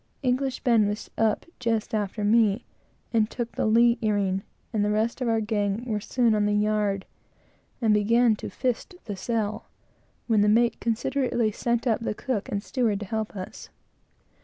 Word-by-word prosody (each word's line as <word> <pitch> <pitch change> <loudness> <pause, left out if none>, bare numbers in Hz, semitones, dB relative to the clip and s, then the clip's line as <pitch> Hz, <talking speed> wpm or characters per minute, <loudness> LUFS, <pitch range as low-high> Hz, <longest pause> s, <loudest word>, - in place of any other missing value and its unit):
English 255 +1 0
Ben 230 -5 +4
was 210 +1 -4
on 225 - +2
the - - +5
yard - - -4
just 225 -3 -1
after 210 0 -2
me, 215 +1 +3 0.5
and 220 -2 +3
took 240 -2 -4
the - - -1
lee 235 +2 +4
earing, 200 -3 +1 0.3
and 210 -2 +1
the 205 - +1
rest 220 +4 0
of 250 - 0
our 225 -1 +2
gang 210 +1 -1
were 215 -4 -1
soon 235 +1 +1
on 210 -1 +2
the 210 - +1
yard, 210 -2 +1 0.8
and 220 -2 +4
began 225 +2 +4
to - - -6
fist 255 - -2
the 205 - -4
sail, 215 +2 -2 0.6
when 220 -3 +3
the 210 - +4
mate 235 +2 +3
considerately 235 0 0
sent 235 +3 -1
up 230 -3 +2
the 230 - -3
cook 230 -5 -3
and 200 0 -2
steward, 225 -6 0
to 210 - -5
help 220 +1 -3
us. 185 -1 -8
220 Hz, 185 wpm, -26 LUFS, 210-235 Hz, 0.8 s, the